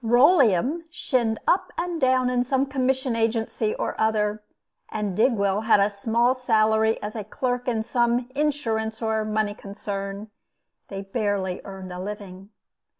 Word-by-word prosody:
Rolleum 255 - +4
shinned 240 -8 0
up 370 - +2
and 345 -2 -2
down 255 -1 +3
in 245 -1 +2
some 265 +2 +1
commission 265 -2 0
agency 225 -1 0
or - - -2
other, 215 -1 +1 0.5
and 210 -3 -3
Digwell 205 -3 +2
had 220 -2 +5
a 200 +1 +3
small 230 +5 +2
salary 220 -3 +2
as 210 +2 -5
clerk 250 0 -2
in 225 -3 0
some 240 +1 +1
insurance 230 -7 -1
or 220 -1 0
money 215 -1 0
concern. 200 0 -6 0.6
They 195 -1 -6
barely 195 -3 -2
earned 190 -2 -8
a 180 - -6
living. 195 -1 -7
220 Hz, 140 wpm, -24 LUFS, 205-250 Hz, 0.6 s, had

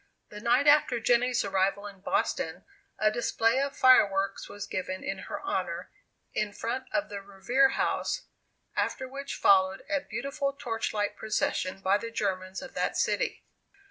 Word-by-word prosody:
The 210 - -8
night 235 +5 +3
after 290 -4 +5
Jenny's 245 +1 +2
arrival 195 +1 +1
in 200 -2 -9
Boston, 175 -2 -1 0.3
a 215 - +3
display 235 +2 +1
of 280 0 -3
fireworks 195 -6 +4
was 205 -1 -6
given 185 0 -4
in 195 0 -3
her - - -4
honor, - - -3 0.4
in 210 -1 -1
front 245 +5 -3
of 300 - 0
the 200 -1 -5
Revere 200 +8 +2
House, - - 0 0.5
after 260 - -1
which 275 +2 -6
followed 190 -1 +4
a 290 -2 +2
beautiful 275 0 -3
torchlight 225 -5 -2
procession 195 -3 -1
by 195 +2 +3
the 230 - -5
Germans 190 -3 -2
of 270 - -10
that - - -1
city. - - 0
215 Hz, 150 wpm, -29 LUFS, 195-260 Hz, 0.5 s, after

